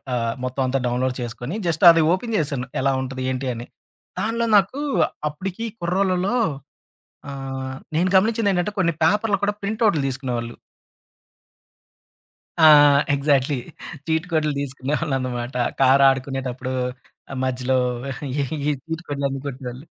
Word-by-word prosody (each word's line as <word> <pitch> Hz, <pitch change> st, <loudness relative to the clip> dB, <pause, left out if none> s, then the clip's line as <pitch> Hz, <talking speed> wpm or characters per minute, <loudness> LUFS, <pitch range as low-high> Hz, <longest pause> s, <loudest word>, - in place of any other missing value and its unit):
ఆహ్, 115 Hz, -1 st, -1 dB
మొత్తమంతా 130 Hz, 0 st, -1 dB
డౌన్‌లోడ్ 125 Hz, +1 st, 0 dB
చేసుకొని, 125 Hz, -, -5 dB
జస్టది 165 Hz, 0 st, +6 dB
ఓపెన్ 230 Hz, +3 st, -4 dB
జేశాను, 140 Hz, -5 st, -1 dB
ఎలా 135 Hz, 0 st, +2 dB
ఉంటది, 130 Hz, 0 st, -5 dB
ఏంటి 130 Hz, 0 st, -2 dB
అని. 120 Hz, +1 st, -8 dB, 0.5 s
దానిలో 230 Hz, +2 st, 0 dB
నాకూ 205 Hz, +9 st, +1 dB, 0.5 s
అప్పుడికీ 190 Hz, +9 st, -5 dB
కుర్రోళ్ళలో 185 Hz, +4 st, 0 dB, 1.0 s
ఆహ్, 135 Hz, -1 st, -5 dB, 0.2 s
నేను 180 Hz, +3 st, +2 dB
గమనిచ్చిందేంటంటే, 205 Hz, -2 st, +2 dB
కొన్ని 170 Hz, -3 st, +2 dB
పేపర్లు 210 Hz, +4 st, +2 dB
కూడా 205 Hz, -, +1 dB
ప్రింటవుట్లు 210 Hz, -5 st, +1 dB
దీసుకునేవాళ్ళు. 125 Hz, -3 st, -3 dB, 2.1 s
ఆ! 160 Hz, -, +7 dB, 0.5 s
ఎగ్జాక్ట్‌లీ. 140 Hz, -1 st, +2 dB, 0.5 s
చీట్ 160 Hz, +2 st, 0 dB
కోడ్లు 155 Hz, -2 st, +1 dB
దీసుకునేవాళ్ళనమాట. 130 Hz, -3 st, -3 dB, 0.3 s
కారాడుకునేటప్పుడూ 135 Hz, -1 st, +2 dB, 0.6 s
ఆహ్, 135 Hz, -, -5 dB
మధ్యలో 130 Hz, 0 st, 0 dB, 0.6 s
ఈ -, -, +1 dB, 0.2 s
చీట్ 145 Hz, -2 st, -1 dB
కోడ్‌లన్నీ 140 Hz, -5 st, -3 dB
కొట్టేవోళ్ళు. 130 Hz, +1 st, -7 dB
140 Hz, 105 wpm, -22 LUFS, 130-175 Hz, 2.1 s, ఆ